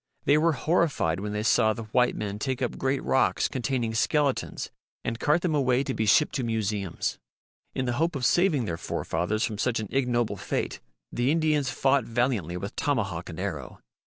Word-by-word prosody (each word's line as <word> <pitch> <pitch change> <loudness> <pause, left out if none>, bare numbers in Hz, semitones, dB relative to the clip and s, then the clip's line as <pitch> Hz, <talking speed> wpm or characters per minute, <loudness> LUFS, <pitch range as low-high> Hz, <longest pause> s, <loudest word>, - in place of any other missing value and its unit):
They 145 - +5
were 160 +2 +3
horrified 140 - +1
when 105 +1 -4
they 105 0 -2
saw 110 -1 +4
the 115 - -6
white 125 +3 +2
men 105 -1 -4
take 130 +2 -2
up 125 - -2
great 135 0 0
rocks 130 - +2
containing 125 -3 -2
skeletons 140 +4 0 0.3
and 115 0 -3
cart 150 +6 +2
them 175 -4 +1
away 130 -3 +2
to 135 - -3
be 110 -3 -1
shipped 150 +7 +4
to 130 - -1
museums. 105 -6 -2 0.6
In 130 - -1
the 120 - 0
hope 165 -1 +1
of 130 -3 -1
saving 170 -8 +3
their 85 -4 -3
forefathers 90 +7 -2
from 105 -2 -2
such 120 -1 +1
an 105 -3 -5
ignoble 125 -4 0
fate - - -3 0.3
the 120 +2 0
Indians 155 -3 +2
fought 135 -1 +2
valiantly 115 -8 0
with 100 +2 -6
tomahawk 100 - -1
and 80 - -7
arrow. 80 -10 -5
120 Hz, 190 wpm, -27 LUFS, 105-140 Hz, 0.6 s, They